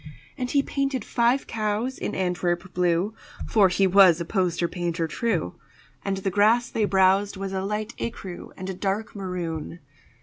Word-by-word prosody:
And 250 Hz, -1 st, -3 dB
he 280 Hz, +1 st, +2 dB
painted 275 Hz, -5 st, -2 dB
five 240 Hz, +3 st, +2 dB
cows 220 Hz, +4 st, -2 dB
in -, -, -3 dB
Antwerp 180 Hz, 0 st, -1 dB
blue 180 Hz, +3 st, +1 dB, 0.3 s
(For 205 Hz, -4 st, +4 dB
he 185 Hz, +2 st, +2 dB
was 185 Hz, -3 st, +6 dB
a 170 Hz, -, -3 dB
poster 175 Hz, -3 st, 0 dB
painter 170 Hz, -1 st, -2 dB
true), 180 Hz, -, -1 dB, 0.5 s
And 195 Hz, -1 st, -1 dB
the 195 Hz, 0 st, -2 dB
grass 225 Hz, +5 st, +3 dB
they 220 Hz, -, +1 dB
browsed 195 Hz, +1 st, +3 dB
was 195 Hz, 0 st, -4 dB
a 190 Hz, -, -1 dB
light 210 Hz, +3 st, -3 dB
écru 190 Hz, -6 st, -6 dB
And 185 Hz, -, -6 dB
a 190 Hz, -, -3 dB
dark 200 Hz, +4 st, -2 dB
maroon. 175 Hz, -4 st, -4 dB
195 Hz, 165 wpm, -25 LUFS, 180-215 Hz, 0.5 s, was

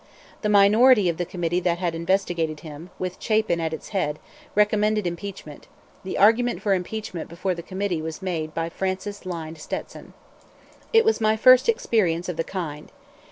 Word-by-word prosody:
The 210 Hz, -, 0 dB
minority 210 Hz, +1 st, +6 dB
of 165 Hz, -, -2 dB
the 175 Hz, -, -3 dB
committee 175 Hz, -1 st, -1 dB
that 175 Hz, -1 st, 0 dB
investigated 170 Hz, -2 st, -1 dB
him, 160 Hz, +2 st, -10 dB
with 185 Hz, 0 st, -4 dB
Chapin 215 Hz, -6 st, +1 dB
at 160 Hz, -1 st, -1 dB
its 160 Hz, -, -7 dB
head, 150 Hz, -7 st, -1 dB, 0.4 s
recommended 210 Hz, 0 st, +2 dB
impeachment; 175 Hz, -3 st, -6 dB, 0.4 s
the 190 Hz, -, -4 dB
argument 230 Hz, +4 st, +4 dB
for 200 Hz, -, +2 dB
impeachment 185 Hz, -2 st, -4 dB
before 180 Hz, +3 st, -2 dB
the 170 Hz, -, -6 dB
committee 185 Hz, -2 st, -3 dB
was 160 Hz, 0 st, -5 dB
made 170 Hz, -5 st, -3 dB
by 165 Hz, 0 st, -1 dB
Francis 190 Hz, +2 st, -4 dB
Lynde 165 Hz, -3 st, -6 dB
Stetson. -, -, -7 dB, 0.8 s
It 455 Hz, 0 st, +5 dB
was 445 Hz, -, +2 dB
my 215 Hz, 0 st, +3 dB
first 255 Hz, -, +6 dB
experience 190 Hz, -, +1 dB
of 175 Hz, -, -4 dB
the 165 Hz, -, 0 dB
kind. 160 Hz, -5 st, -6 dB
185 Hz, 160 wpm, -24 LUFS, 165-210 Hz, 0.8 s, minority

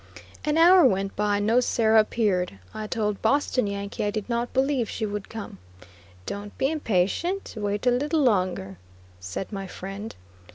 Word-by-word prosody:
An 300 Hz, +1 st, +1 dB
hour 355 Hz, +2 st, +7 dB
went 195 Hz, -6 st, +2 dB
by 205 Hz, 0 st, +1 dB
and 205 Hz, -, -1 dB
no 230 Hz, +3 st, +4 dB
Sarah 225 Hz, -3 st, +3 dB
appeared. 205 Hz, -, +1 dB, 0.2 s
I 215 Hz, 0 st, -5 dB
told 210 Hz, -3 st, -2 dB
Boston 255 Hz, -1 st, +2 dB
Yankee 200 Hz, 0 st, -4 dB
I 205 Hz, -, +1 dB
did 210 Hz, -1 st, -4 dB
not 235 Hz, 0 st, -1 dB
believe 265 Hz, -3 st, +1 dB
she 220 Hz, -, -3 dB
would 205 Hz, -1 st, -5 dB
come. 220 Hz, -, -8 dB, 0.7 s
"Don't 205 Hz, 0 st, -6 dB
be 270 Hz, -, +1 dB
impatient; 310 Hz, -, -1 dB
wait 205 Hz, +1 st, -2 dB
a 250 Hz, -, +5 dB
little 290 Hz, +5 st, +1 dB
longer," 180 Hz, -, 0 dB, 0.4 s
said 95 Hz, -, -6 dB
my 195 Hz, -1 st, -4 dB
friend. 195 Hz, +4 st, -7 dB
215 Hz, 165 wpm, -25 LUFS, 200-250 Hz, 0.7 s, hour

